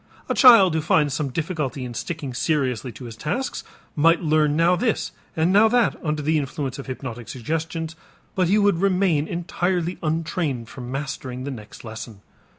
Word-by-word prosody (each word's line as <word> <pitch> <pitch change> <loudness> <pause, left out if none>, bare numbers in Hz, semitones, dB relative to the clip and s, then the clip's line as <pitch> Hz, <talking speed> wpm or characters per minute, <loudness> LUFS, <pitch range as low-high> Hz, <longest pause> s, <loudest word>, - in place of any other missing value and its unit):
A - - 0
child 230 - +8
who 160 - +1
finds 150 -2 +2
some 150 -1 -1
difficulty 150 -3 -3
in 120 - -6
sticking 150 0 -5
seriously 130 -3 -1
to 125 - -10
his 115 -2 -8
tasks 210 - -3 0.3
might 165 +3 +4
learn 155 -2 +2
now 170 +3 +4
this 225 +3 -1 0.2
and 165 +3 +2
now 210 +2 +7
that 240 +1 +2
under 150 -2 -1
the 155 +1 +2
influence 140 -1 -4
of 140 - -8
hypnotic 125 -3 -6
suggestions 160 +5 -3 0.4
but 185 -2 +1
he 200 +4 +3
would 205 -4 +3
remain 185 -5 +2
entirely 175 0 -2
untrained 155 -6 -2
for 130 - -9
mastering 130 0 -5
the 140 - -4
next 110 -5 -10
lesson. 110 -2 -8
155 Hz, 170 wpm, -23 LUFS, 130-175 Hz, 0.4 s, child